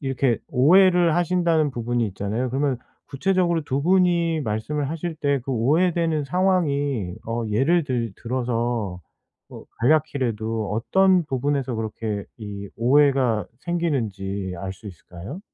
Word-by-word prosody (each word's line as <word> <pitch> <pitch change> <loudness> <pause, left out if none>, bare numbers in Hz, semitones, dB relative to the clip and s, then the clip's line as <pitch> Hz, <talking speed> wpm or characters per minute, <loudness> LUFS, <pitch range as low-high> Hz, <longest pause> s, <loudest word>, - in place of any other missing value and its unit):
이렇게 135 -3 0
오해를 175 +4 +5
하신다는 170 -3 +2
부분이 120 -1 -1
있잖아요. 105 +6 -3
그러면 135 -1 0 0.3
구체적으로 170 +2 0
2 140 -1 -1
분이 170 -2 +2
말씀을 135 +6 -2
하실 165 +1 -4
때 145 -3 0
그 135 - -3
오해되는 160 +5 +1
상황이 145 - 0
어 115 +1 -2
예를 145 +10 +2
들 120 -6 -2
들어서 120 -5 -2 0.5
뭐 - - -12
간략히라도 115 -7 0
어떤 185 - +3
부분에서 135 -2 -1
그렇게 110 -2 -4
이 100 -2 -7
오해가 130 -4 +3
생기는지 105 - -2
알 95 +2 -4
수 105 +3 -14
있을까요? 90 - -10
135 Hz, 295 characters per minute, -23 LUFS, 110-165 Hz, 0.5 s, 오해를